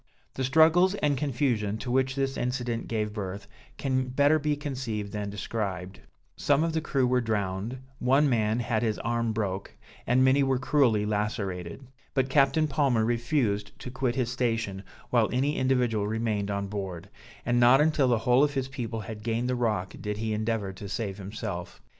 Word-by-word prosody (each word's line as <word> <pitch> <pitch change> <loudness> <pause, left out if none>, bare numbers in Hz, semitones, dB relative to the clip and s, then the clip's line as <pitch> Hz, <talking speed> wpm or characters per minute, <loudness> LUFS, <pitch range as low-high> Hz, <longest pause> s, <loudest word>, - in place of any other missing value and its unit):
The 130 - -3
struggles 160 +7 +5
and 150 -7 +1
confusion 120 -6 0
to 120 +2 -5
which 130 +1 +1
this 135 -1 -1
incident 120 -2 -2
gave 105 -2 -2
birth, 100 -1 -5 0.3
can 130 -1 0
better 145 +4 +3
be 150 0 0
conceived 125 -8 -4
than 105 -1 -3
described; 100 -3 -4 0.4
some 145 +2 +2
of 165 -1 -1
the 160 - 0
crew 135 -4 +1
were 125 0 +2
drowned, 105 +1 -2 0.2
one 135 +4 +4
man 115 -2 +1
had 115 -2 0
his 110 -3 0
arm 115 -1 -1
broke, 100 -3 -3 0.3
and 130 +2 +4
many 130 +2 +4
were 135 -1 +2
cruelly 130 -5 +2
lacerated; 105 -1 -3 0.3
but 135 -1 +1
Captain 150 +3 +3
Palmer 135 -6 +2
refused 115 -3 0
to 125 - -8
quit 130 -2 -1
his 125 -2 0
station, 115 -6 -1 0.3
while 115 -3 +3
any 140 +4 +1
individual 125 -5 +1
remained 110 -2 -1
on 100 0 -2
board; 95 -3 -5 0.4
and 120 0 +2
not 120 +2 +6
until 150 -3 +3
the 120 -2 +3
whole 125 +2 +5
of 145 -1 +1
his 135 -1 -1
people 120 -5 -4
had 105 +1 -7
gained 115 +2 -1
the 125 - 0
rock 110 -6 -1
did 105 0 -3
he 110 0 -2
endeavor 110 -2 -1
to 100 +1 -8
save 100 -1 -3
himself. 100 -2 -6
120 Hz, 175 wpm, -27 LUFS, 105-135 Hz, 0.4 s, not